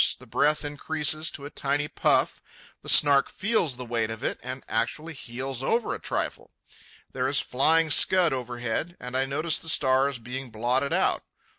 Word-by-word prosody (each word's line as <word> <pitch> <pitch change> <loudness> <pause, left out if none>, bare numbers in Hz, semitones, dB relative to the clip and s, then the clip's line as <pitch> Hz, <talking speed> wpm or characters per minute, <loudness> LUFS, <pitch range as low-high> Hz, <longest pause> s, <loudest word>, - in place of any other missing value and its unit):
The - - -14
breath 150 +1 +1
increases 155 +1 0
to 140 - -8
a 145 - -8
tiny 145 +1 -1
puff. - - 0 0.4
The - - -6
Snark 140 -2 +6
feels 190 - 0
the 125 0 -7
weight 115 -2 -1
of 110 0 -7
it - - -2
and 130 +1 -7
actually 155 +8 -2
heels 130 -1 -5
over 225 - 0
a - - -6
trifle. - - -4 0.6
There 130 -1 -2
is 140 +1 +2
flying 160 +5 +2
scud 175 -3 +5
overhead, 125 +6 -4
and 125 +1 -8
I 135 +1 +1
notice 155 +4 +1
the 165 - -4
stars 135 -2 +3
being 125 +2 -7
blotted 120 +5 -1
out. - - +1
135 Hz, 170 wpm, -26 LUFS, 125-155 Hz, 0.6 s, Snark